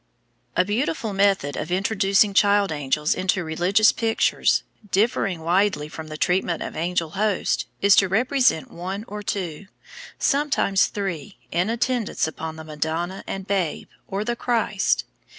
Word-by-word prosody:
A 180 - +4
beautiful 225 +1 -1
method 195 -7 +2
of 155 +3 -4
introducing 195 +1 +2
child 200 -1 +4
angels 150 +1 0
into 185 0 0
religious 180 +7 +3
pictures, 225 -1 +1 0.3
differing 195 -4 +1
widely 175 -2 +1
from 155 +1 -8
the 155 0 -7
treatment 180 -1 0
of - - -7
angel 170 -1 -1
hosts, 205 +1 0 0.2
is 200 -1 +7
to 195 - +5
represent 245 - +2
one 190 +5 -5
or 210 +1 -6
two, 190 -3 -4 0.5
sometimes 275 -9 +2
three, 195 -2 -5
in 175 +5 +1
attendance 235 0 0
upon 160 0 -5
the 160 - -9
Madonna 160 +4 -3
and 195 -1 -5
Babe, 190 -5 -2 0.2
or 195 +2 -2
the 240 +1 -1
Christ. 225 -5 0
195 Hz, 140 wpm, -23 LUFS, 165-210 Hz, 0.5 s, is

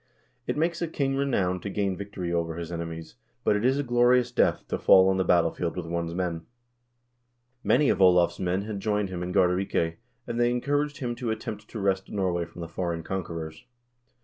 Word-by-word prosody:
"It - - -1
make 170 +2 0
I 170 - 0
king 135 -4 -1
renowned 95 -10 0
to 100 - -4
gain 100 -1 -1
victory 95 -3 -5
over 85 -1 -1
his 85 0 -6
enemies, 85 -1 -6 0.3
but - - +3
it 105 - -1
is 130 +2 +3
a 145 - 0
glorious 120 0 +3
death - - +1
to - - -2
fall 95 0 +6
on 95 - +1
the 95 - +2
battlefield 85 -1 +1
with 90 - -3
one's 85 0 -3
men." 85 -3 -3 1.2
Many 150 - +3
of - - +1
Olav's 90 -2 +5
men 90 +2 0
had 105 -1 -5
joined 105 0 0
him 90 -1 -5
in 90 0 -3
Gardarike, 90 -2 +1 0.3
and 120 - -3
they 120 0 +4
encouraged 145 +4 0
him 125 -4 -3
to 120 - -3
attempt 110 -1 -5
to 110 - -7
wrest 95 -1 0
Norway 90 -4 -1
from 85 +1 -11
the 85 - -5
foreign 85 -1 -3
conquerors. 85 -2 -5
95 Hz, 200 wpm, -27 LUFS, 85-120 Hz, 1.2 s, fall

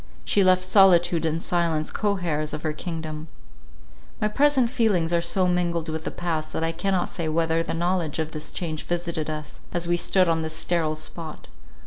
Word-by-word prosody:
She 200 - +3
left 185 0 +4
solitude 175 -3 +5
and 160 +1 -1
silence 165 -3 0
co 205 -2 0
heirs 155 -3 -1
of 150 - -5
her 155 - -1
kingdom. 155 -1 -5 0.9
My 215 - +1
present 270 0 +3
feelings 200 -10 +1
are 170 - +3
so 180 +2 +1
mingled 170 -2 0
with 160 0 -4
the - - -1
past, 165 -3 -3
that 160 - -2
I 165 - +1
cannot 185 +2 0
say 165 -3 -4
whether 165 +1 +1
the 165 - -3
knowledge 170 -2 -1
of 160 -1 -2
this 155 -1 -6
change 160 -3 -4
visited 170 -3 -2
us, 155 -1 -6
as 175 0 -2
we 175 0 +2
stood 185 +1 +3
on 165 -1 +1
this 160 0 -4
sterile 160 -3 0
spot. 155 0 -7
170 Hz, 190 wpm, -25 LUFS, 160-180 Hz, 0.9 s, solitude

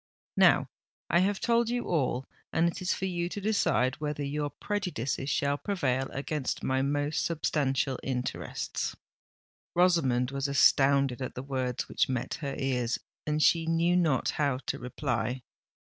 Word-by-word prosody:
Now - - +5 0.4
I 170 - +5
have 195 +2 +1
told 235 -1 +2
you 245 0 -1
all—and 150 +2 -1
it 170 - -3
is 185 - 0
for 190 - -1
you 175 -2 -1
to 205 - -5
decide 195 - +1
whether 150 -1 -2
your 145 +1 -2
prejudices 150 - -3
shall 145 0 +1
prevail 135 -10 -1
against 145 0 -3
my 130 0 +1
most 145 +2 0
substantial 140 -5 0
interests." 125 -2 -3 0.8
Rosamond 135 -9 +3
was 140 +1 -1
astounded 140 -1 +4
at 130 - -4
the 125 - -5
words 130 -2 -2
which - - +1
met 130 -2 -2
her 140 -2 -3
ears; 125 -3 0 0.3
and 150 0 +1
she 165 -1 +4
knew 165 +2 +2
not 160 -8 +2
how 140 -3 +2
to - - -2
reply. 125 -1 -2
140 Hz, 145 wpm, -29 LUFS, 130-170 Hz, 0.8 s, Now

